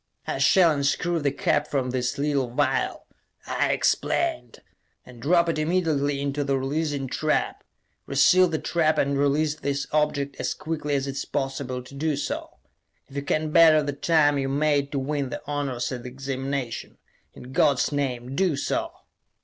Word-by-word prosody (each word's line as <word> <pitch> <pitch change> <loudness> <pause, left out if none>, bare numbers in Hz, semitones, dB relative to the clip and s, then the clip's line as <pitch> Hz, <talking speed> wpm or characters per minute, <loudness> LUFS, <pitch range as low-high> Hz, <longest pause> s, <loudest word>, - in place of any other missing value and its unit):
"I - - -3
shall 180 -4 +5
unscrew 155 +4 0
the 145 -2 0
cap 145 +2 0
from 130 -3 -1
this 125 -1 -1
little 140 -3 0
vial," 145 +5 -1 0.4
I - - 0
explained, 335 -2 0 0.5
"and 125 -2 -14
drop 170 +5 +3
it 165 -2 0
immediately 155 -4 0
into 140 +1 -1
the 135 -1 0
releasing 140 +1 -2
trap. 155 +4 -1 0.4
Re - - -5
seal 185 0 +6
the 160 -2 -1
trap 160 -1 +1
and 140 0 +1
release 145 +2 +2
this 140 -2 -3
object 150 -2 0
as - - -2
quickly 155 -2 -3
as 135 -1 0
it 135 0 -5
is - - -3
possible 135 -2 -3
to 125 - -14
do 150 +2 -1
so. - - -4 0.5
If 135 - -14
you 140 - -1
can 155 +2 -1
better 155 -2 +6
the 145 0 -2
time 145 -1 +3
you 135 0 -1
made 145 0 +1
to 145 - -2
win 140 0 -2
the - - -6
honors 140 -4 -2
at 125 -2 -4
the 125 - -7
Examination 135 -1 -4 0.4
in 125 - -11
God's 140 +1 +2
name, 130 -3 -2
do 180 -5 +1
so!" 330 - -2
145 Hz, 175 wpm, -25 LUFS, 135-155 Hz, 0.5 s, seal